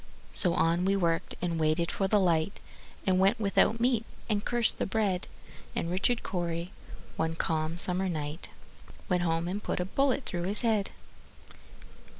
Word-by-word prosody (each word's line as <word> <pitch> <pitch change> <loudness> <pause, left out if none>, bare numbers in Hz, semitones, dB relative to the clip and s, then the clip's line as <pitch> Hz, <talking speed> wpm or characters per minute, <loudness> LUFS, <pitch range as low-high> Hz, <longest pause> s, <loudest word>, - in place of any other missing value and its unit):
So 175 -2 +4
on 170 +1 +2
we 195 +1 +2
worked, 170 -4 0
and 170 -2 -1
waited 160 +2 +1
for 195 - 0
the 210 +1 +3
light, 170 0 +1 0.5
And 185 -2 +3
went 195 +3 +3
without 205 +1 +3
the - - -8
meat, 240 -3 +3 0.3
and 205 -1 +1
cursed 240 -2 +1
the - - 0
bread; 200 -3 0 0.5
And 165 - -1
Richard 195 +6 +1
Cory, 175 -1 -3 0.5
one 160 0 0
calm 160 0 -1
summer 185 +1 0
night, 150 0 -4 0.6
Went 180 -1 +2
home 165 0 0
and 195 +4 -3
put - - -2
a 180 - 0
bullet 270 +6 +1
through 175 -1 -1
his 205 +3 +2
head. 220 -4 +1
180 Hz, 165 wpm, -29 LUFS, 170-205 Hz, 0.6 s, So